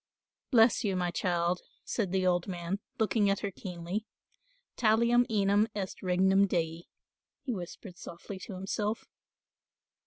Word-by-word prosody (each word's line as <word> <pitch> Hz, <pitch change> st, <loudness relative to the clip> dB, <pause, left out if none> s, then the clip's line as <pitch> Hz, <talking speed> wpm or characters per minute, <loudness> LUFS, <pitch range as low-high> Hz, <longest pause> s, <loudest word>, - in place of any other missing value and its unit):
"Bless 235 Hz, -1 st, +5 dB
you, 200 Hz, -3 st, 0 dB
my 180 Hz, -1 st, 0 dB
child," 175 Hz, -1 st, 0 dB, 0.2 s
said 200 Hz, -6 st, -1 dB
the 190 Hz, -1 st, +1 dB
old 175 Hz, 0 st, +2 dB
man, 180 Hz, +1 st, -3 dB, 0.2 s
looking 210 Hz, -1 st, +2 dB
at 195 Hz, -, +1 dB
her 200 Hz, -, -2 dB
keenly, 180 Hz, +3 st, -5 dB, 0.7 s
"talium 235 Hz, +2 st, +4 dB
enim 205 Hz, 0 st, +3 dB
est 195 Hz, -2 st, -4 dB
regnum 190 Hz, +2 st, +4 dB
dei," 165 Hz, -2 st, -1 dB, 0.6 s
he 255 Hz, -, -2 dB
whispered 180 Hz, 0 st, -8 dB
softly 185 Hz, +3 st, -8 dB
to 195 Hz, -, -7 dB
himself. 205 Hz, +3 st, -2 dB
195 Hz, 130 wpm, -30 LUFS, 180-215 Hz, 0.7 s, Bless